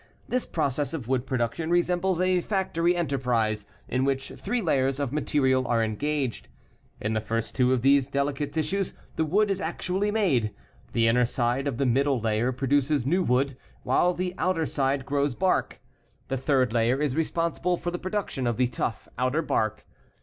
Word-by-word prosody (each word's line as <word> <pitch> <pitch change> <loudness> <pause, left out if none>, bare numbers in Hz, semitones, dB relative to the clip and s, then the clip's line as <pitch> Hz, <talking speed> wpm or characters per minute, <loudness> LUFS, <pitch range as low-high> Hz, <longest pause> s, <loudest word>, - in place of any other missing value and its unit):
This 255 0 -1
process 145 0 -1
of 130 -8 -6
wood 130 0 0
production 130 +6 -1
resembles 175 +1 +1
a 185 -1 +3
factory 175 -3 0
enterprise 125 -9 0 0.2
in 130 +1 0
which 135 0 -1
three 240 +5 -3
layers 135 - +1
of 140 -2 -2
material 130 -4 +1
are 115 -1 +2
engaged. 135 +3 -2 0.5
In 105 +1 -2
the 110 - 0
first 115 +1 -3
two 125 -1 +3
of 125 -2 +1
these 135 -1 +4
delicate 140 +1 -1
tissues 170 +5 -1 0.2
the 160 - +1
wood 200 +6 +2
is 195 - -1
actually 185 +4 -1
made. 140 - +1 0.4
The 115 -1 +3
inner 120 +2 +4
side 125 +2 0
of 135 -5 -2
the 140 - +1
middle 135 +2 +2
layer 110 +2 +1
produces 140 +1 +1
new 175 +7 +2
wood 135 -3 +1 0.3
while 180 0 +2
the 180 0 -2
outer 180 -3 +1
side 135 -2 0
grows 140 -2 0
bark. 185 +4 0 0.5
The 135 - 0
third 130 -3 +1
layer 120 +3 +2
is 145 -3 0
responsible 170 +2 0
for 175 - -3
the 175 - -4
production 185 -9 -2
of 120 - 0
the 125 - +3
tough, 120 -2 -3
outer 130 +6 +1
bark. 110 -7 -1
140 Hz, 175 wpm, -26 LUFS, 125-170 Hz, 0.5 s, these